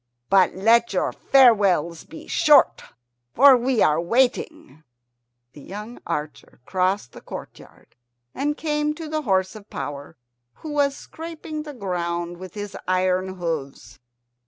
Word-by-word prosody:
But 190 -2 +4
let 230 +3 +3
your 185 - 0
farewells 200 - +3
be - - -12
short, - - +4 0.5
for 275 +1 +8
we 250 -1 +1
are 155 +2 +2
waiting." 255 - -1 0.7
The 145 - -13
young 210 - -9
archer 150 0 -5
crossed 185 -6 -1
the - - -13
courtyard - - -12 0.4
and 295 +2 -2
came 300 -1 -1
to 325 0 -7
the 310 0 -2
horse 190 -5 0
of 215 -1 -13
power, 145 -1 -7 0.4
who 310 - -8
was 285 -1 +1
scraping 320 -1 -8
the 300 -2 -9
ground 175 -4 -3
with 185 +2 -10
his 205 -1 -6
iron 185 0 0
hoofs. 145 - -5
200 Hz, 135 wpm, -23 LUFS, 175-275 Hz, 0.7 s, for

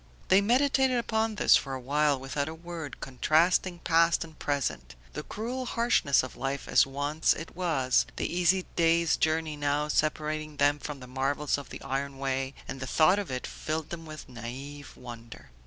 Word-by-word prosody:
They 190 +2 +6
meditated 260 +3 +3
upon 220 -2 0
this - - +5
for 135 -1 -1
a - - -5
while 145 +2 +1
without 140 +2 -3
a 160 - -7
word, 165 -4 -8
contrasting 165 +7 +2
past 170 0 +3
and 160 -1 -14
present; 130 - -2 0.2
the 150 - -4
cruel 245 +9 -5
harshness 230 - +2
of 130 - -7
life 135 +1 -3
as - - +4
once 145 +3 +1
it 165 - -8
was, 155 -8 +1
the - - -2
easy 180 +1 +2
day's 165 -1 +3
journey 160 -1 0
now 145 +1 0
separating 155 0 -1
them 145 +1 +3
from 145 -2 -7
the - - -8
marvels 135 +3 0
of 140 - -10
the - - -9
iron 135 0 -3
way, 135 0 -2
and 135 - -6
the 130 - -5
thought 180 +8 +4
of 200 - -4
it 130 -1 -3
filled 155 0 -4
them 165 -1 -6
with 155 -1 -9
naive 130 +4 -8
wonder. 115 - -11
150 Hz, 180 wpm, -28 LUFS, 135-170 Hz, 0.2 s, They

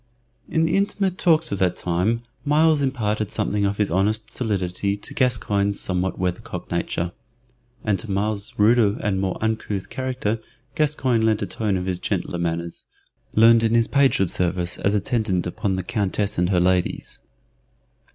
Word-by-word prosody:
In 160 - +2
the 165 - +1
intimate 195 -2 0
talks 165 -2 +3
of 100 - -2
that 90 -2 +2
time 95 +7 0 0.2
Myles 155 +1 +3
imparted 110 -6 -1
something 100 0 0
of 100 0 -2
his 105 -4 0
honest 105 +5 0
solidity 100 -4 -1
to - - -10
Gascoyne's 100 -6 +1
somewhat 90 0 -1
weathercock 90 +1 -4
nature, 85 0 -1 0.7
and 100 -4 +1
to 115 - -6
Myles's 105 +4 -1
ruder 105 -1 +4
and 95 -2 0
more 95 -2 -1
uncouth 110 -3 -2
character 130 -4 -2 0.3
Gascoyne 140 -7 +1
lent 110 -2 +2
a - - 0
tone 100 +1 -1
of 90 - -3
his 90 -2 -2
gentler 90 - -2
manners, 85 0 -3 0.5
learned 115 +1 +7
in 115 0 +2
his 115 -1 +3
pagehood 135 -10 +3
service 90 -1 -1
as 100 +1 +1
attendant 105 -4 0
upon 100 +2 -2
the 95 - -3
Countess 105 -4 -1
and 90 0 +2
her 90 -2 +3
ladies. 90 0 0
105 Hz, 160 wpm, -23 LUFS, 95-115 Hz, 0.7 s, learned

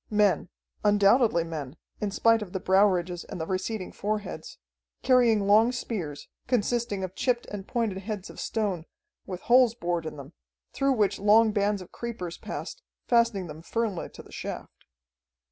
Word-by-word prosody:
Men 205 -4 +2 0.3
undoubtedly 205 -2 +4
men, 155 -4 -6 0.2
in 210 - -1
spite 225 +3 +3
of 195 -4 -7
the 190 - -1
brow 190 +3 +5
ridges 180 -2 -2
and - - -8
the 160 - -2
receding 190 +2 -3
foreheads, 210 0 -4 0.5
carrying 235 -5 +4
long 215 +4 +5
spears, 190 - -5 0.2
consisting 235 -4 0
of 185 -1 -4
chipped 245 +3 0
and 200 -2 -6
pointed 225 -6 -1
heads 205 -1 -5
of - - -12
stone, 195 -7 -2 0.4
with 180 -2 -5
holes 245 -1 +5
bored 175 -7 -2
in 155 - -7
them, 140 +3 -10 0.4
through 275 0 +2
which 205 -5 +1
long 215 +2 +5
bands 205 -2 0
of 180 - -18
creepers 220 -8 -6
passed, - - -6 0.2
fastening 235 -5 +2
them 155 -1 -9
firmly 215 0 -2
to - - -12
the - - -17
shaft. - - -7
205 Hz, 160 wpm, -27 LUFS, 185-230 Hz, 0.5 s, brow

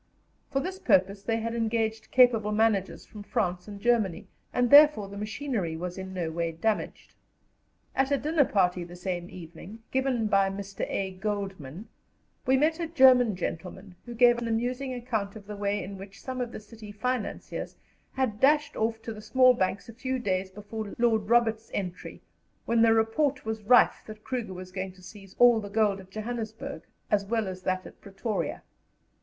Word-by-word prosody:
For 275 - 0
this 370 +6 -4
purpose 195 - +2
they 225 +3 -1
had 230 +1 -3
engaged 225 -1 -1
capable 235 -4 +4
managers 210 -3 +1
from 210 - -11
France 180 -2 -2
and 205 -1 -8
Germany, 220 -6 +1 0.3
and 245 -1 +1
therefore 290 -8 +8
the 200 - -10
machinery 210 - -3
was 180 +1 -5
in 190 0 -7
no 175 -3 -3
way 165 0 -2
damaged. 210 +6 -2 0.8
At 270 0 +2
a 280 - +2
dinner 300 0 +2
party 180 -4 +1
the 175 +1 -10
same 180 -1 -4
evening, 180 +6 -11
given 260 -3 +1
by 195 -2 +3
Mr. 195 0 -5
A. 190 -1 -2
Goldmann, 195 -4 -5 0.6
we 265 +1 +5
met 315 +4 +2
a 335 - -2
German 255 - +5
gentleman 180 +2 -6
who 240 - -7
gave 240 0 +5
an 235 - -3
amusing 250 +4 -1
account 230 -5 -3
of 210 -2 -10
the 210 0 -7
way 205 0 -1
in 195 +1 -8
which 195 +1 -11
some 255 -1 -5
of 240 -1 -3
the - - -7
city 215 0 -12
financiers 250 +1 -4 0.4
had 255 -6 -1
dashed 295 +2 +3
off 225 0 -1
to 225 - -5
the 215 - -10
small 255 +4 +5
banks 190 -4 -1
a 230 - -10
few 260 +3 -3
days 190 -5 -1
before 210 +2 -7
Lord 220 -3 +2
Roberts's 225 -2 +2
entry, 180 -2 -5 0.4
when 230 0 +2
the 225 0 +6
report 270 +6 +1
was 220 0 -3
rife 235 +3 +5
that 215 0 -10
Kruger 230 -7 -4
was 185 0 -9
going 185 0 -5
to 185 0 -19
seize 195 -1 -13
all 245 -2 +6
the 205 -2 -7
gold 205 -2 +1
at 190 0 -13
Johannesburg 225 +5 -5 0.3
as 205 -1 +3
well 220 0 -1
as 185 0 -6
that 185 0 -1
at - - -13
Pretoria. 200 +2 -4
215 Hz, 185 wpm, -28 LUFS, 195-240 Hz, 0.8 s, therefore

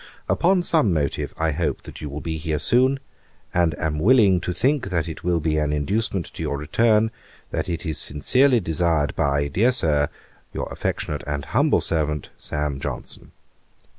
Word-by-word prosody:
Upon 180 +1 +3
some 155 - +3
motive, 75 -4 -1
I 80 0 +1
hope, 80 +1 -2
that - - -10
you 75 - -5
will 75 +2 -6
be 80 -1 -3
here 80 0 -2
soon; 130 - +3 0.5
and 85 -4 +2
am 75 -1 -1
willing 105 -2 +5
to 90 - -2
think 130 - +1
that 85 -3 -1
it 80 - -7
will 85 -1 +1
be 80 0 0
an 75 -1 0
inducement 95 +4 -1
to - - -7
your 70 - -2
return, 110 +8 +2 0.4
that - - -2
it 85 -1 -3
is 80 -3 -2
sincerely 125 - +3
desired 80 -5 0
by, 70 0 +1
dear 105 - +2
Sir, 75 - +2 0.4
'Your - - -3
affectionate - - -3 0.2
humble - - +2
servant, 75 -3 -1
'SAM. 75 -2 -3
JOHNSON.' - - -5
80 Hz, 165 wpm, -23 LUFS, 75-110 Hz, 0.5 s, willing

